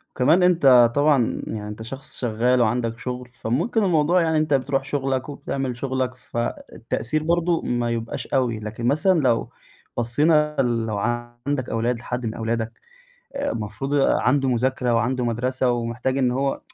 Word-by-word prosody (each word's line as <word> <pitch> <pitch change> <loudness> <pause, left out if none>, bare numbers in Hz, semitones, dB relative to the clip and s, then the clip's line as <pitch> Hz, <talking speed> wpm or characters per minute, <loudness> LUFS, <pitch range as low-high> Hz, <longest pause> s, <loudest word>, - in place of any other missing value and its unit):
وكمان 155 +8 +4
أنت 135 -10 +6
طبعًا 145 -5 +2
يعني 105 -1 -5
أنت 105 +1 -7
شخص 135 +4 -8
شغّال 120 +1 +2
وعندك 115 0 0
شغل، 125 +1 -5
فممكن 150 - 0
الموضوع 175 -1 +3
يعني 160 -1 +1
أنت 155 -1 +1
بتروح 135 0 +1
شغلك 135 -1 -2
وبتعمل 135 -3 -4
شغلك 130 0 -2
فالتأثير 120 +2 -4
برضو 170 +1 +1
ما 120 -1 -1
يبقاش 115 0 -4
أوي، 125 -5 0
لكن 110 +2 -4
مثلًا 175 +6 +3
لو 125 -5 +1 0.5
بصينا 150 +5 +2
ال 120 -3 0
لو 110 -2 -2 0.5
عندك 140 -3 -1
أولاد 115 +1 -1
لحد 125 +1 -4
من 110 - -2
أولادك 115 0 -3 0.5
المفروض 135 - -3
عنده 135 -1 +2
مذاكرة 125 0 +1
وعنده 125 +2 0
مدرسة 125 +2 0
ومحتاج 120 +2 -2
إن 130 -2 +2
هو 135 +2 -1
125 Hz, 145 wpm, -23 LUFS, 115-145 Hz, 0.5 s, أنت